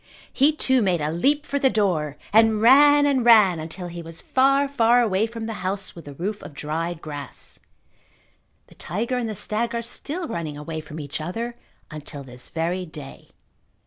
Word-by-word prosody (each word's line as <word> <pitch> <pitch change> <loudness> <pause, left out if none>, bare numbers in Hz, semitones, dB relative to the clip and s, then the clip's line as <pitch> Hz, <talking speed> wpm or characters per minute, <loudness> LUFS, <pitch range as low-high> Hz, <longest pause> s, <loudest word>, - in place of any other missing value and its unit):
He, 285 +3 +4
too, 260 -4 +2
made 185 -5 +1
a 150 0 -1
leap 285 - +1
for 280 -1 -2
the 270 - +4
door 170 - 0 0.2
and 220 0 +5
ran 290 +5 +6
and 275 -3 +2
ran 210 -7 +6
until 165 +3 -6
he 175 0 -7
was 165 0 -9
far, 275 +2 +2
far 240 -3 +3
away 220 -2 +2
from 230 0 -7
the 225 - -4
house 195 +1 -2
with 170 - -11
the 145 -1 -10
roof 200 +7 -4
of 145 - -11
dried 160 +3 -4
grass. 145 -2 -8 1.1
The - - -19
tiger 235 +8 -3
and 230 -2 -3
the 215 - -4
stag 230 +4 -2
are 235 - -2
still 315 +8 -5
running 155 - -4
away 155 +2 -5
from 155 0 -9
each 145 +1 -5
other 230 +9 -4 0.4
until 150 -2 -8
this 125 -1 -7
very 170 +3 -2
day. 150 -5 -11
195 Hz, 185 wpm, -23 LUFS, 160-240 Hz, 1.1 s, ran